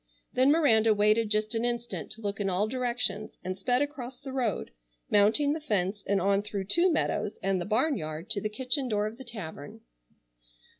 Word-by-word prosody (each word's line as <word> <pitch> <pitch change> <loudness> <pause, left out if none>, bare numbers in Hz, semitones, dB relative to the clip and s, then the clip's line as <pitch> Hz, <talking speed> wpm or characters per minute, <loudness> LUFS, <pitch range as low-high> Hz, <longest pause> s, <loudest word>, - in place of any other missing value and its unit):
Then 255 +2 +4
Miranda 225 -9 +4
waited 215 +2 +3
just 215 +1 +1
an 225 0 -1
instant 240 0 -3
to 225 - -12
look 205 -1 -3
in 200 -1 0
all 190 +3 +1
directions, 245 -3 -2
and 185 0 -3
sped 245 +7 +1
across 265 -4 -6
the 275 -2 -8
road, 245 -7 -1 0.4
mounting 220 +8 +4
the 315 - -4
fence 205 -6 -1
and 200 0 +2
on 195 +2 +2
through 205 -1 -4
two 340 - +3
meadows, 215 -8 -1
and 190 -1 +1
the - - -3
barnyard 205 - -1
to 205 -3 0
the 215 - -1
kitchen 260 +4 0
door 210 -1 +1
of 220 +3 -6
the - - -7
tavern. 175 - -8
215 Hz, 190 wpm, -29 LUFS, 200-255 Hz, 0.4 s, Then